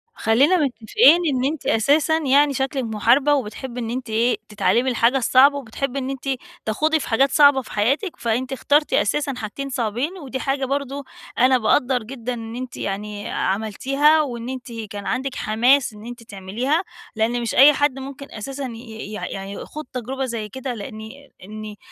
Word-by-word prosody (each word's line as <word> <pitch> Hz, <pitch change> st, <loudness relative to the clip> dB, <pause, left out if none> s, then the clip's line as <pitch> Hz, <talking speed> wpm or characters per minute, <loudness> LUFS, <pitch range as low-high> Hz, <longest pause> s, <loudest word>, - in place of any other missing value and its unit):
خلّينا 270 Hz, +11 st, +3 dB
متفقين 300 Hz, -, +4 dB
إن 260 Hz, -2 st, 0 dB
أنتِ 300 Hz, +1 st, -3 dB
أساسًا 290 Hz, +8 st, +3 dB
يعني 285 Hz, -1 st, +3 dB
شكلِك 265 Hz, 0 st, -1 dB
محاربة، 235 Hz, +6 st, +3 dB
وبتحبي 250 Hz, -1 st, -3 dB
إن 230 Hz, -2 st, -4 dB
أنتِ 250 Hz, 0 st, -4 dB
إيه، 230 Hz, +3 st, +1 dB
تتعلّمي 235 Hz, +4 st, +1 dB
الحاجة 240 Hz, +1 st, +2 dB
الصعبة 270 Hz, +3 st, +5 dB
وبتحبي 275 Hz, +2 st, -4 dB
إن 260 Hz, -, -4 dB
أنتِ 275 Hz, 0 st, -5 dB, 0.4 s
تَخوضي 310 Hz, +9 st, +1 dB
في -, -, -6 dB
حاجات 265 Hz, +4 st, +3 dB
صعبة 285 Hz, -2 st, +6 dB
في 245 Hz, -, -14 dB
حياتِك، 275 Hz, -, 0 dB
فأنتِ 245 Hz, +3 st, -1 dB
اخترتِ 290 Hz, +3 st, +1 dB
أساسًا 285 Hz, +6 st, +1 dB
حاجتين 260 Hz, +6 st, -5 dB
صعبين، 250 Hz, -, -2 dB
ودي 270 Hz, -6 st, -6 dB
حاجة 270 Hz, 0 st, -1 dB
برضه 280 Hz, +1 st, -3 dB, 0.3 s
أنا 255 Hz, +1 st, +5 dB
باقدّر 250 Hz, +1 st, +1 dB
جدًا 250 Hz, +1 st, -5 dB
إن 225 Hz, -1 st, -7 dB
أنتِ 255 Hz, 0 st, -6 dB
يعني 205 Hz, +1 st, -4 dB
عملتيها 270 Hz, +10 st, +2 dB
وإن 245 Hz, -4 st, -4 dB
أنتِ 260 Hz, -1 st, -7 dB
كان 210 Hz, -3 st, -7 dB
عندِك 265 Hz, +3 st, -2 dB
حماس 240 Hz, +3 st, +2 dB
إن 210 Hz, +1 st, -12 dB
أنتِ 240 Hz, 0 st, -9 dB
تعمليها، 225 Hz, -, -2 dB, 0.3 s
لإن 230 Hz, +2 st, 0 dB
مش 235 Hz, -, -3 dB
أي 285 Hz, +3 st, +8 dB
حد 280 Hz, -2 st, 0 dB
ممكن 275 Hz, +1 st, -9 dB
أساسًا 270 Hz, +6 st, -6 dB
ي -, -, -4 dB
ي 225 Hz, -3 st, -9 dB
يع 210 Hz, -, -4 dB
يع 195 Hz, -, -6 dB
يخوض 205 Hz, +10 st, -7 dB
تجربة 260 Hz, +2 st, -3 dB
زي 230 Hz, -4 st, -4 dB
كده، 260 Hz, +1 st, -5 dB
لإني 220 Hz, +4 st, -9 dB
إني 215 Hz, +1 st, -8 dB
255 Hz, 175 wpm, -22 LUFS, 225-275 Hz, 0.4 s, أي